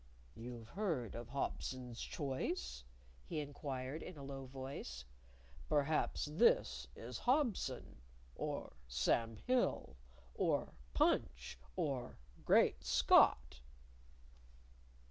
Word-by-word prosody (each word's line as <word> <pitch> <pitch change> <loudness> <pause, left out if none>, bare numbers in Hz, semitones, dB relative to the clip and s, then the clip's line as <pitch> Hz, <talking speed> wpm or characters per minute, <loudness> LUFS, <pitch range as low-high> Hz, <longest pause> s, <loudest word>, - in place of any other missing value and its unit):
"You've 115 +1 -8
heard 165 - -1
of 120 0 -6
Hobson's 130 -2 -3
choice?" 60 - -3 0.4
he 150 - -3
inquired 140 0 -4
in 180 - -8
a 140 - -8
low 135 -1 -6
voice. 130 - -6 0.6
"Perhaps 150 0 +2
this 65 - +3
is 120 +1 -6
Hobson, 240 - +1 0.4
or - - -4
Sam 85 - +1
Hill, 250 - +1 0.4
or - - +1 0.2
Punch, - - +1 0.2
or 135 -5 -2 0.3
Great - - +4
Scott." 60 - +5
130 Hz, 90 wpm, -38 LUFS, 110-145 Hz, 0.6 s, Scott